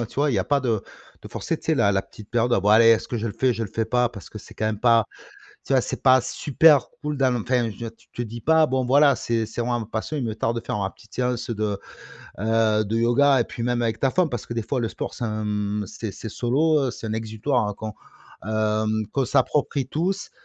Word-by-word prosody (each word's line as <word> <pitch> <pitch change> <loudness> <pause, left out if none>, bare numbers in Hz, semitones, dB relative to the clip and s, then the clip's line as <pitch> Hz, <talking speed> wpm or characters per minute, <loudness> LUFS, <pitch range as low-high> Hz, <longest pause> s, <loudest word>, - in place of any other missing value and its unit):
heu, 120 - -2
tu - - -17
vois, 145 +1 +2
il - - 0
y - - +2
a - - 0
pas 145 -1 +1
de 115 -6 0 0.4
de - - -9
forcer, - - -3
tu - - -21
sais, - - +3
la 100 - +3
la 95 - +2
petite 105 +1 -14
période 120 0 +1
«Ah, - - +2
bah, 105 +2 +3
allez, 115 +1 +7
est-ce 115 -1 +4
que 120 - -2
je 110 - -2
le 105 - -4
fais, 130 -1 +2
je 115 -1 -4
le 105 - -3
fais 115 +3 -1
pas?» 125 +2 +1
parce 100 -9 -12
que - - -8
c'est - - -14
quand 110 - -3
même 110 -1 -1
pas, 115 -2 +4 0.6
tu - - -1
vois, 130 - +4
c'est - - -5
pas 130 -1 +6
super 145 0 +3
cool 150 -1 -3
dans 130 -2 +2
enfin, 125 -1 0
tu 115 +2 -9
te - - -3
dis 120 0 -6
pas: 160 +5 +4
«Bon, 130 -3 -1
enfin, 130 - -1
voilà, 140 +1 +5
c'est 115 -1 -1
c'est 110 - -8
vraiment 120 0 0
ma 110 - -5
passion, 110 +7 -4
il 140 - -2
me 110 -2 -2
tarde 115 +1 -1
de - - -27
faire 105 - -2
ma 95 -1 -1
petite 110 -4 -21
séance 125 -1 -2
de, 105 -3 -1 0.6
heu, 110 0 +2
de 105 +2 -3
yoga» 130 +4 +4
et - - +3
puis 115 - -8
même 120 0 0
avec 115 -1 -1
ta 135 - +2
femme 175 +4 +1
parce 120 -3 -4
que 120 - -5
des 115 - -1
fois 130 +4 -2
le 115 -2 -1
sport - - -5
c'est, 120 - -4
hem, 105 -1 -2
c'est 110 +2 -6
c'est 110 - -8
solo, 140 +5 +1
c'est 120 - -8
un 110 - -2
exutoire 110 0 -1
qu'on, 110 0 -6 0.5
hem, 110 0 0
qu'on 135 -2 0
s'approprie 140 +2 +1
tous 180 +8 -2
115 Hz, 265 wpm, -24 LUFS, 110-130 Hz, 0.6 s, allez